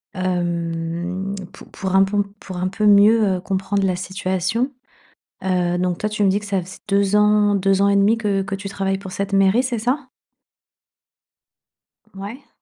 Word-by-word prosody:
Hem, 175 Hz, +1 st, -2 dB, 0.2 s
pou -, -, -13 dB
pour 190 Hz, -1 st, -4 dB
un 195 Hz, -, +6 dB
bon, 205 Hz, +1 st, +2 dB, 0.2 s
pour 185 Hz, -2 st, -8 dB
un 180 Hz, -, -1 dB
peu 210 Hz, +3 st, -2 dB
mieux, 210 Hz, +2 st, +6 dB
heu, -, -, -6 dB
comprendre 195 Hz, +1 st, -1 dB
la 185 Hz, -2 st, +1 dB
situation, 190 Hz, +7 st, -2 dB, 0.7 s
heu, 180 Hz, -2 st, 0 dB
donc, 180 Hz, -1 st, 0 dB
toi, 215 Hz, -, -2 dB
tu 210 Hz, -1 st, -1 dB
me 195 Hz, -, +4 dB
dis 200 Hz, +2 st, +1 dB
que 205 Hz, -, -10 dB
ça 195 Hz, -2 st, -1 dB
faisait 185 Hz, +2 st, -10 dB
2 200 Hz, 0 st, +2 dB
ans, 210 Hz, -1 st, +4 dB
2 195 Hz, 0 st, +2 dB
ans 200 Hz, -, +4 dB
et 200 Hz, -, +3 dB
demi 205 Hz, +3 st, +4 dB
que 200 Hz, -3 st, 0 dB
que 195 Hz, 0 st, -4 dB
tu 195 Hz, 0 st, -7 dB
travailles 195 Hz, 0 st, -2 dB
pour 195 Hz, -2 st, -9 dB
cette 200 Hz, +1 st, -3 dB
mairie, 195 Hz, +5 st, +4 dB
c'est 245 Hz, -3 st, -2 dB
ça? 255 Hz, +4 st, -1 dB, 2.1 s
Mouais. 205 Hz, +8 st, -9 dB
195 Hz, 180 wpm, -21 LUFS, 185-205 Hz, 2.1 s, un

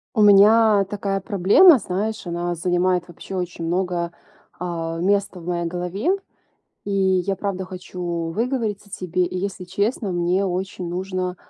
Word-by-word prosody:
У 215 Hz, -, +3 dB
меня 210 Hz, +1 st, +6 dB
такая 195 Hz, 0 st, -3 dB
проблема, 205 Hz, -, +6 dB
знаешь, 210 Hz, +1 st, -3 dB
она 175 Hz, 0 st, -2 dB
занимает 180 Hz, +1 st, 0 dB
вообще 175 Hz, +2 st, -9 dB
очень 180 Hz, -2 st, -4 dB
много, 175 Hz, 0 st, -1 dB, 0.5 s
а, 165 Hz, -2 st, -3 dB
места 200 Hz, +1 st, 0 dB
в 165 Hz, -, -12 dB
моей 170 Hz, -1 st, -2 dB
голове. 180 Hz, -, -2 dB, 0.8 s
И -, -, -5 dB
я 190 Hz, -1 st, +1 dB
правда 190 Hz, -2 st, -3 dB
хочу 180 Hz, -1 st, -8 dB, 0.3 s
выговориться 220 Hz, -1 st, -2 dB
тебе. 180 Hz, -2 st, -1 dB
И 180 Hz, -, -4 dB
если 190 Hz, -1 st, -4 dB
честно, 200 Hz, +3 st, -1 dB
мне 175 Hz, +2 st, +1 dB
очень 185 Hz, -1 st, -3 dB
нужно, 185 Hz, 0 st, -3 dB
185 Hz, 140 wpm, -22 LUFS, 175-200 Hz, 0.8 s, меня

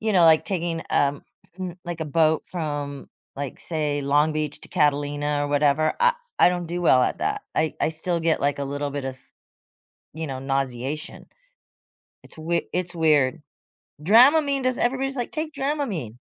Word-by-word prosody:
you 220 Hz, 0 st, 0 dB
know, 180 Hz, -3 st, +5 dB
like, 160 Hz, -1 st, +6 dB
taking, 170 Hz, -4 st, -2 dB
um, 145 Hz, 0 st, +1 dB, 0.4 s
mm 180 Hz, -2 st, -5 dB
like, 175 Hz, -1 st, -5 dB
a -, -, -1 dB
boat 155 Hz, +1 st, +2 dB
from, 145 Hz, -5 st, -4 dB, 0.3 s
like, 140 Hz, -2 st, -5 dB
say, 150 Hz, -3 st, -2 dB
Long 145 Hz, +3 st, +2 dB
Beach 150 Hz, -1 st, -3 dB
to -, -, -7 dB
Catalina, 145 Hz, -2 st, +1 dB
or 145 Hz, -, -3 dB
whatever, 145 Hz, +1 st, +2 dB
I 485 Hz, 0 st, +5 dB, 0.2 s
I -, -, +7 dB
don't 175 Hz, -1 st, -2 dB
do 175 Hz, +1 st, -3 dB
well 130 Hz, -7 st, +5 dB
at -, -, 0 dB
that. 420 Hz, 0 st, -2 dB
I 160 Hz, -, 0 dB
I -, -, +2 dB
still 170 Hz, +2 st, -2 dB
get, 160 Hz, -1 st, +1 dB
like, 140 Hz, 0 st, 0 dB
a 140 Hz, -, -2 dB
little 145 Hz, +1 st, -3 dB
bit 140 Hz, -1 st, -4 dB
of, 130 Hz, -1 st, -5 dB, 1.0 s
you 160 Hz, +1 st, -4 dB
know, 130 Hz, -1 st, -5 dB
nauseation. 135 Hz, +2 st, -3 dB, 1.0 s
It's -, -, -12 dB
wei 170 Hz, +2 st, -1 dB
it's 180 Hz, 0 st, -2 dB
weird. 155 Hz, -3 st, +2 dB, 0.6 s
Dramamine 275 Hz, -, +5 dB
does 255 Hz, -1 st, +1 dB
everybody's 270 Hz, +2 st, 0 dB
like, 245 Hz, -3 st, -3 dB
"Take 310 Hz, 0 st, -4 dB
Dramamine." 270 Hz, -, -3 dB
155 Hz, 175 wpm, -24 LUFS, 145-180 Hz, 1.0 s, I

